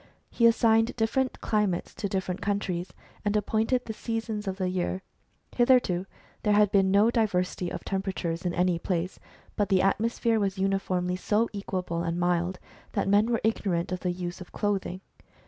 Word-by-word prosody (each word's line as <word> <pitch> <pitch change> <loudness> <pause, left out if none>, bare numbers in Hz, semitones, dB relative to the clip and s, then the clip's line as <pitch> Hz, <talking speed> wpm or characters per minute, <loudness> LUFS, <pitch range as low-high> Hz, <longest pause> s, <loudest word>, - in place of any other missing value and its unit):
He 235 - +5
assigned 225 0 +3
different 245 +3 0
climates 210 -5 0
to 200 -1 -3
different 185 -1 -2
countries, 190 -3 -2 0.3
and 205 0 +1
appointed 220 +4 +1
the 220 - -4
seasons 225 -2 -3
of 190 0 -2
the 185 -2 -1
year. 185 +1 -2 0.5
Hitherto 240 -8 +3 0.3
there 210 - +2
had 210 -1 +4
been 195 -1 +4
no 205 +4 +5
diversity 185 -6 0
of - - -5
temperature 190 -4 -2
in 180 - 0
any 180 -1 +2
place, 180 +1 -2 0.4
but 205 -2 0
the 190 -1 +4
atmosphere 225 +3 +1
was 195 -1 -1
uni 195 0 +1
formly 180 -1 -1
so 215 +4 +1
equable 185 -4 -3
and 170 0 -2
mild 175 +1 +1 0.4
that - - 0
men 205 +2 +4
were 230 -2 +1
ignorant 190 -6 0
of 185 - -2
the 180 - -1
use 175 0 -5
of 180 - -10
clothing. 195 -3 -2
195 Hz, 170 wpm, -27 LUFS, 180-220 Hz, 0.5 s, He